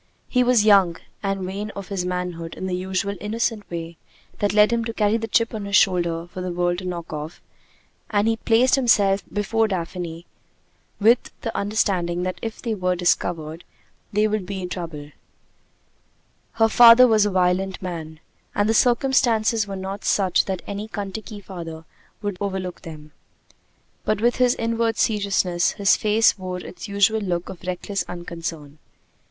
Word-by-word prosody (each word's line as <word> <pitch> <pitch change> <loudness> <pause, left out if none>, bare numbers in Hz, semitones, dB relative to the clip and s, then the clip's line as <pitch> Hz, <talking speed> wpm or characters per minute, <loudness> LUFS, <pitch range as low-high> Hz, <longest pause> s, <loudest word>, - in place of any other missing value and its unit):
He 250 -1 +2
was 245 -4 +3
young, 195 -5 +5 0.2
and 195 -1 -2
vain 200 +3 -4
of 200 -2 -7
his 190 -3 -2
manhood 180 -2 -4
in - - -5
the 185 - -2
usual 190 +2 -2
innocent 220 0 -2
way 165 -1 -6 0.4
that 205 -1 +1
led 210 +2 +4
him 230 -1 0
to 230 -1 -5
carry 210 0 +2
the 225 0 -4
chip 230 +2 +1
on 210 -2 -4
his 200 0 -1
shoulder 170 -4 +2
for 180 +1 -8
the 180 0 -3
world 175 0 0
to 185 - -8
knock 170 -3 -5
off; 155 +2 -6 0.7
and 205 0 +1
he 225 - +2
placed 230 +3 +3
himself 205 -7 +4
before 220 +2 +1
Daphne 175 -3 -4 0.7
with 225 +3 +4
the 225 - -4
understanding 185 -4 0
that 185 0 -3
if 225 -1 -6
they 230 -2 -1
were 185 -3 0
discovered, 170 -2 -1 0.5
there 210 +1 +2
would 210 -3 -2
be 190 -2 -4
trouble. 165 -5 -6 1.4
Her 225 -1 +3
father 235 +2 +8
was 215 -3 +4
a - - 0
violent 185 0 +1
man, 160 -4 -6 0.4
and 205 0 +2
the 225 - +2
circumstances 235 -3 +2
were 195 - -5
not 195 +2 -6
such 190 -3 +2
that 190 -2 -4
any 205 +1 -5
Kentucky 205 +1 -6
father 165 -4 -8 0.4
would 205 -3 -3
overlook 190 -3 -4
them. 155 -2 -10 0.9
But 215 -1 0
with 240 +2 +2
his 250 -1 +3
inward 230 0 -1
seriousness, 195 -5 +1
his 200 -2 +3
face 215 0 +3
wore 185 -1 -4
its 180 +3 -9
usual 200 +2 +2
look 175 -3 -2
of 185 -3 -9
reckless 185 +2 -3
unconcern. 165 -4 -7
195 Hz, 165 wpm, -23 LUFS, 175-215 Hz, 1.4 s, father